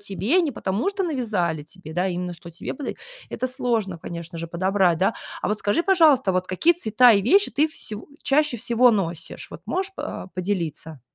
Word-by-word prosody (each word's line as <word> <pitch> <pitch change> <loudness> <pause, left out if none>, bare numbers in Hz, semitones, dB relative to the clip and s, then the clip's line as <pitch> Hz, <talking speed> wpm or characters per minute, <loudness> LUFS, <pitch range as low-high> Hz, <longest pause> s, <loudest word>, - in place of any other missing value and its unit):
тебе, 205 - +1
не 305 -6 -1
потому 205 - -1
что 395 -1 -2
навязали 210 - -1
тебе, 160 0 -11
да, 180 +3 0
именно 180 0 -3
что 170 0 -11
тебе 170 - -6
подойдет. 280 - -6 0.3
Это 255 - -2
сложно, 235 -8 -1
конечно 170 +1 -7
же, 165 - -4
подобрать, 185 0 +2
да. 195 +4 +2 0.3
А - - 0
вот 210 0 -1
скажи, 205 +11 +1
пожалуйста, 315 - +4
вот 185 0 0
какие 185 - +3
цвета 245 - +5
и 200 - +4
вещи 395 - +4
ты 305 +2 +2
всего 215 -8 -7 0.2
чаще 295 -2 +2
всего 235 +2 +4
носишь, 170 -6 -3
вот 165 - -9
можешь 380 - -2
по 290 - -6
поделиться? 170 -6 -3
205 Hz, 190 wpm, -23 LUFS, 175-265 Hz, 0.3 s, цвета